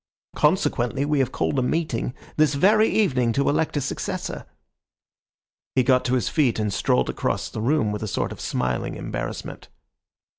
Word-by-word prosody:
Consequently, 125 +4 +1
we 150 -1 +1
have 130 -2 +1
called 140 - 0
a - - +2
meeting 125 -3 -1 0.2
this 150 -2 +3
very 215 +8 +4
evening 130 - +2
to 140 - +1
elect 155 +1 +1
a - - +1
successor." 135 - -4 1.3
He 130 - +4
got 130 0 +3
to 125 - +2
his 125 - 0
feet 135 -7 +2
and 105 -2 -1
strolled 65 -7 +1
across - - -2
the 110 - -5
room 125 -2 +1
with 105 - -4
a 110 - -3
sort - - -2
of - - -8
smiling 65 0 -2
embarrassment. - - -6
130 Hz, 170 wpm, -24 LUFS, 115-150 Hz, 1.3 s, very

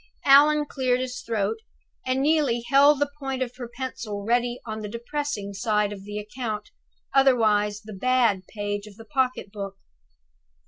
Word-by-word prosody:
Allan 295 +2 +6
cleared 255 -3 0
his 255 -1 -4
throat, 220 -1 -1 0.5
and 260 +1 +1
Neelie 285 -6 +2
held 280 +3 +6
the 290 0 0
point 270 -2 -2
of 250 -1 -8
her 245 -2 -6
pencil 225 -6 -5
ready 240 +1 +1
on 220 -1 -5
the 210 - -5
depressing 235 -2 -4
side 210 +1 0
of 195 -1 -10
the 205 0 -6
account 210 0 -5 0.4
otherwise 215 -6 +3
the 215 0 -9
"Bad" 225 -3 +2
page 205 -1 -4
of 205 - -13
the 225 +1 -13
pocket 255 -6 -1
book. 200 -2 -6
235 Hz, 155 wpm, -25 LUFS, 210-260 Hz, 0.5 s, Allan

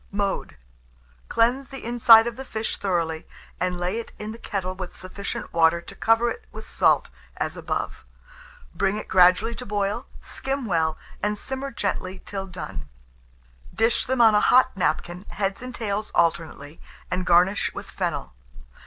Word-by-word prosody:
Mode. 200 - -2 0.7
Cleanse 250 +4 +2
the 270 -2 -9
inside 230 -1 +7
of 235 -1 -3
the 265 - -7
fish 220 -4 -3
thoroughly, 165 -5 -1 0.3
and 180 0 0
lay 180 +5 -1
it 230 - -8
in 210 +1 -5
the 230 - -9
kettle 185 -5 -3
with 185 -1 -7
sufficient 195 +2 -6
water 165 0 +4
to 170 - -11
cover 225 +1 +3
it - - -7
with 220 0 -9
salt - - +2 0.3
as - - -2
above; - - -3 0.7
bring 195 +3 +1
it 215 - -6
gradually 185 +5 +5
to 250 - -6
boil, 205 -2 -2
skim 270 -1 -3
well, 160 -5 +1 0.2
and 210 0 0
simmer 265 +5 -4
gently 190 -5 -3
till 195 -1 -5
done; 95 - -7 0.9
dish 225 +4 +2
them 260 -1 +2
on 225 -2 +7
a 210 - +4
hot 255 -1 +5
napkin, 180 -1 -1
heads 195 0 -2
and 250 0 -7
tails 215 -1 -2
alternately, 165 -3 0 0.3
and 180 0 0
garnish 180 +3 +4
with - - -6
fennel. - - -3
200 Hz, 160 wpm, -25 LUFS, 180-230 Hz, 0.9 s, inside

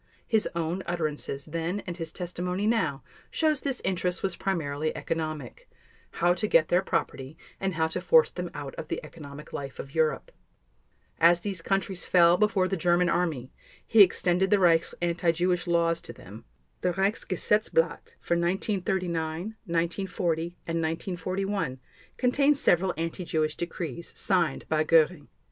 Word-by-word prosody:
His 220 -2 +1
own 170 +2 -1
utterances 155 -5 -3
then 165 +5 -3
and 175 - -5
his 165 -2 -5
testimony 180 +2 -3
now 165 -12 +1 0.3
shows 310 -3 +1
this 275 -3 -3
interest 180 -1 -1
was 190 -3 0
primarily 155 -6 -2
economic—how 165 - -3
to 215 +4 -1
get 160 -5 +4
their 180 - +4
property 135 -5 -3 0.2
and 190 -2 -2
how 160 0 +2
to - - -3
force 485 -1 +5
them - - -5
out - - -6
of - - -6
the - - -3
economic 150 -2 -11
life 135 -2 -6
of 135 - -8
Europe. 160 - 0 0.9
As 170 +1 +5
these 195 -3 -4
countries 190 0 -1
fell 170 -1 +5
before 200 -1 +2
the 195 - -1
German 175 +1 +2
Army, 155 -8 -1 0.3
he 225 - +6
extended 185 0 +4
the 205 - +5
Reich's 170 -3 +3
anti 170 0 +2
Jewish 180 +2 0
laws 170 -1 +2
to 120 - -8
them; 105 0 -12 0.4
the 180 -1 +1
Reichsgesetzblatt 210 - 0
for - - -1
1939, 180 -1 -1 0.2
1940, 170 0 -1 0.2
and 165 0 -2
1941 175 -1 -2 0.4
contains 280 +3 +3
several 180 -3 +3
anti 165 +2 -3
Jewish 155 -2 -1
decrees 170 -2 -5
signed 175 -7 +1
by 155 0 +2
Göring. 160 -1 +3
175 Hz, 145 wpm, -27 LUFS, 160-190 Hz, 0.9 s, he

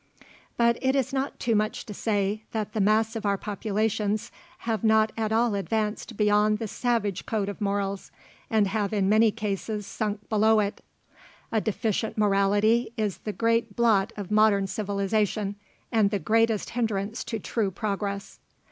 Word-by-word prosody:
But 235 0 +3
it 265 0 +2
is 270 -1 0
not 270 +1 -2
too 235 - +1
much 215 0 0
to 210 - -7
say, 205 0 -1
that 215 -2 -3
the 215 - 0
mass 215 +3 +2
of 225 - -4
our 200 -1 +1
populations 210 +1 -1 0.3
have 225 -1 -1
not 220 0 +4
at 220 -1 -1
all 230 0 +2
advanced 215 +2 -2
beyond 210 0 +3
the 225 - -4
savage 210 -4 -1
code 210 -3 -1
of 205 +1 -6
morals, 200 -1 -2 0.4
and 215 -2 +3
have 200 +1 -1
in 200 -2 +1
many 220 +2 +5
cases 210 0 -3
sunk 205 0 -4
below 220 0 +4
it. 205 -1 -2 0.7
A 220 - +1
deficient 220 0 -1
morality 205 +3 +3
is 205 -5 -1
the 215 - -4
great 230 -1 0
blot 220 -5 +3
of 205 -1 -6
modern 210 -2 +4
civilization, 205 0 -1 0.4
and 220 -3 +3
the 205 - 0
greatest 220 +3 +1
hindrance 220 -2 -2
to 225 - -3
true 215 0 -1
progress. 200 0 -4
215 Hz, 160 wpm, -26 LUFS, 200-225 Hz, 0.7 s, many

